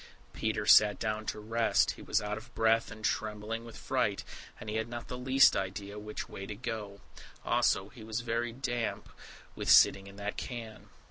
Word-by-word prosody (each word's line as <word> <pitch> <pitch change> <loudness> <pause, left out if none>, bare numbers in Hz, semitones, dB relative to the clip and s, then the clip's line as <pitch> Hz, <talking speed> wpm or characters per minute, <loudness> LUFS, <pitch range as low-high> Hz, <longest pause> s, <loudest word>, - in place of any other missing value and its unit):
Peter - - -1
sat 105 -1 +7
down 110 -1 -3
to - - -3
rest; 115 +2 +2
he - - -11
was - - +1
out 105 0 -2
of 115 +3 -10
breath 115 +1 +3
and 110 -1 -7
trembling 110 +1 -2
with 115 -1 -11
fright, - - -1 0.4
and - - -9
he 105 +1 -2
had 110 +1 -1
not 120 0 -7
the 125 - -4
least 130 +2 +5
idea 100 +2 -4
which 105 0 -6
way 95 - -8
to 105 - -5
go. 105 -3 -5 0.4
Also 95 +1 +2
he 115 - -12
was 110 +2 -3
very 120 0 -1
damp 120 -2 -3 0.5
with - - -3
sitting 100 0 +6
in 100 - -12
that 100 0 -5
can. 115 -3 -7
110 Hz, 190 wpm, -31 LUFS, 105-115 Hz, 0.5 s, sat